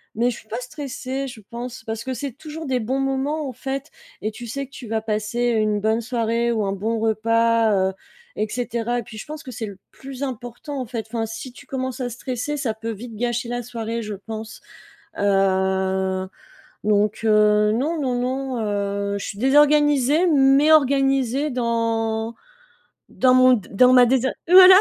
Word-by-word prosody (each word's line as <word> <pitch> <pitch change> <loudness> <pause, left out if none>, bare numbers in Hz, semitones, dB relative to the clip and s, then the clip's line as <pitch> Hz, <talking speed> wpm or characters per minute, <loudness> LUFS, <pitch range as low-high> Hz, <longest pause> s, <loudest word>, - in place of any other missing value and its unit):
mais 235 +3 +2
je 235 - -7
suis - - -19
pas 225 - -4
stressée, 270 0 -5
je 240 -4 -9
pense, 240 0 -7
parce 225 0 -4
que 260 - -3
c'est 275 +3 -4
toujours 315 +5 -8
des 260 -3 0
bons 255 +4 -1
moments, 270 +3 -1
en 260 - -5
fait 270 +4 -5 0.3
et 215 - -2
tu 235 +2 -9
sais 275 +5 -4
que 270 - -22
tu 255 -3 -9
vas 220 0 -1
passer 215 +1 -2
une 215 -2 +1
bonne 220 +2 +1
soirée 235 0 0
ou 220 -3 0
un 195 - -1
bon 220 +4 -2
repas 230 +1 +2 0.2
heu - - -6 0.4
et 215 - -1
cetera 240 0 -2
et - - -5
puis 220 - -11
je - - -7
pense 305 +1 -8
que 255 - -8
c'est 225 -1 -5
le 200 -2 -9
plus 270 0 -8
important, 255 +2 -5
en 255 - -3
fait. 230 -2 -5
Enfin, 225 0 -2
si 225 +3 -7
tu 245 - -15
commences 260 -1 -4
à 250 -1 -2
stresser, 250 +4 -4
ça 260 -6 -1
peut 225 +1 -5
vite 225 +2 -8
gâcher 240 +2 -2
la 245 0 -3
soirée, 230 -1 -4
je 215 -1 -5
pense, 220 +2 -8 0.6
heu, 190 -1 +1 0.6
donc 210 0 +2
heu, 210 -1 +4
non, 300 +8 -1
non, 255 -3 0
non, 260 0 -2 0.6
heu, - - -1
je - - -5
suis 200 - -6
désorganisée, 295 +3 +4
mais 280 0 +5
organisée 275 -1 +3
dans 230 -2 -1 0.7
dans 255 -1 +3
mon 255 0 +6
d 215 -6 -2
dans 250 +5 +5
ma 250 -1 +8
désa 260 +1 +2 0.2
voilà. 370 +1 +10
240 Hz, 190 wpm, -22 LUFS, 220-265 Hz, 0.7 s, voilà